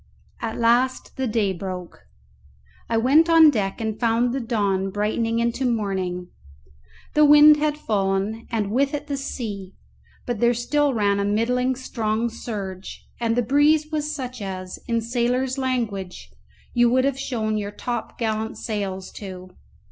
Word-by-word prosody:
At 225 -1 -3
last 240 +3 +1
the 265 -1 -1
day 215 -4 +1
broke; 180 -1 -7 0.9
I 230 - +1
went 285 +8 +4
on 325 -2 +8
deck 200 -5 -2
and 220 -1 -3
found 235 +1 +2
the 270 - -1
dawn 200 -5 0
brightening 220 +3 -1
into 235 +3 0
morning. 190 -7 -1 0.8
The 300 - +5
wind 295 +1 +8
had 300 0 0
fallen 205 -2 -1
and 215 -4 -1
with 275 +5 +1
it 290 - -5
the 285 - -3
sea; 215 -8 -5 0.5
but 240 -3 -3
there 235 +1 +3
still 290 +4 +1
ran 200 -2 +2
a - - +1
middling 250 +5 +1
strong 230 -2 -2
surge, 200 -5 -7
and 230 -1 0
the 245 - +2
breeze 300 +5 +3
was 300 -1 -1
such 255 -5 -6
as, 185 -2 -6
in 230 -1 0
sailors' 250 +3 0
language, 205 - -3 0.4
you 240 0 +4
would 255 +2 +3
have 275 -1 0
shown 220 -5 -2
your 205 -1 -4
top 235 +2 -5
gallant 220 -1 -2
sails 195 -4 -4
to. 185 -2 -8
230 Hz, 155 wpm, -23 LUFS, 205-260 Hz, 0.9 s, on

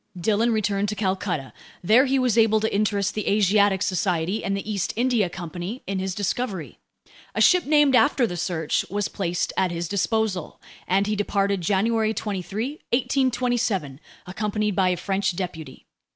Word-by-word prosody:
Dillon 220 +5 +2
returned 205 -2 0
to 210 - -3
Calcutta. 185 - -2 0.3
There 225 +9 +5
he 270 +1 +2
was 255 -4 +1
able 220 -1 +4
to 220 -2 -1
interest 205 -1 0
the 215 - -4
Asiatic 200 -1 +3
Society 185 +1 -1
and 195 0 -1
the 200 - -6
East 200 -4 -2
India 235 -5 +1
Company 180 +6 -6
in 195 0 -2
his 190 -1 -3
discovery. 205 -3 -3 0.6
A - - -1
ship 360 -5 +4
named 295 -3 +4
after 255 +1 +4
the 175 - -4
Search 170 -3 -1
was 205 +2 -1
placed 175 -3 -2
at 185 - +1
his 170 0 -3
disposal, 200 -1 -1 0.3
and 195 +2 +2
he 210 +1 -1
departed 200 -1 0
on - - -7
January 220 +4 +1
23, 210 - -4
1827, 240 - 0 0.3
accompanied 210 +2 -2
by 185 -1 +3
a 180 - 0
French 195 -1 -1
deputy. 165 -6 -6
200 Hz, 165 wpm, -24 LUFS, 185-220 Hz, 0.6 s, There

